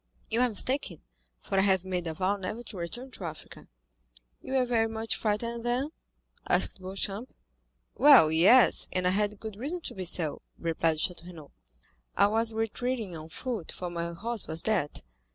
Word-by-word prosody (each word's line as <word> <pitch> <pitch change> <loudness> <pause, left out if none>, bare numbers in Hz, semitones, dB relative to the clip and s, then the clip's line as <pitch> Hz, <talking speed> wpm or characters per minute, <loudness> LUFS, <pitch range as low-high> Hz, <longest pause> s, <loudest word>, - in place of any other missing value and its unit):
"You 230 +2 +2
are 250 - +3
mistaken, 225 - -1 0.4
for 195 - -1
I - - +5
have 190 -2 +3
made 180 -2 -3
a 160 - -4
vow 190 +3 0
never 205 +4 -5
to 210 -3 -10
return 240 +10 -6
to 200 - -10
Africa." 155 -2 -9 0.7
"You - - -7
were 260 -1 +3
very 230 -2 +1
much 225 0 -2
frightened, 230 +2 -2
then?" 250 +5 -1 0.6
asked - - +3
Beauchamp. 195 +5 -3 0.6
"Well, 270 - +7
yes, 195 +11 +6
and 185 -1 -1
I 180 - +3
had 205 +1 0
good 220 -2 -7
reason 305 +10 -3
to - - -2
be 190 -1 -5
so," 165 -4 0 0.2
replied 165 -1 0
Château 175 +1 -2
Renaud. 160 -5 -12 0.7
"I - - +6
was 225 +2 +2
retreating 225 -2 -3
on 160 0 -9
foot, 225 -1 -5
for 180 -1 -6
my 170 0 -3
horse 225 +5 0
was 160 +1 -1
dead. 190 -10 -1
205 Hz, 175 wpm, -28 LUFS, 175-235 Hz, 0.7 s, Well